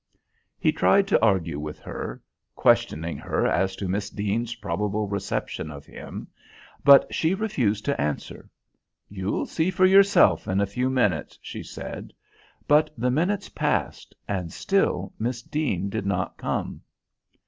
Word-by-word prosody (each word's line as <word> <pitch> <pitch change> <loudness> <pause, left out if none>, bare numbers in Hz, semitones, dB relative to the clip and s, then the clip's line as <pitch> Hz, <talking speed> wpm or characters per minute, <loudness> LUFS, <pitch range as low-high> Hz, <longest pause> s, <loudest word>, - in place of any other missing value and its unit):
He - - +2
tried 200 0 +3
to - - +3
argue 90 -8 +2
with 75 0 -6
her, - - -6 0.3
questioning 80 +2 +2
her - - -1
as 95 0 +1
to 95 - -4
Miss 100 +2 -2
Deane's 110 +4 -2
probable 105 +1 -2
reception 100 -5 -3
of 70 -1 -9
him, - - -9 0.6
but 140 -1 +7
she 165 +4 +1
refused 120 - -1
to 140 - 0
answer. 75 0 -4 0.6
"You'll 95 0 -2
see 165 +2 0
for 185 0 +3
yourself 195 +2 +5
in 95 +1 +1
a 100 - +3
few 125 +6 -1
minutes," 105 - 0
she - - -7
said; - - -8 0.5
but 150 +1 +4
the 125 +2 +1
minutes 180 +8 0
passed - - -2
and 90 -5 -3
still 105 - 0
Miss 120 +2 -2
Deane 120 - -1
did 100 0 -3
not 100 - -1
come. - - -3
105 Hz, 145 wpm, -25 LUFS, 95-150 Hz, 0.6 s, but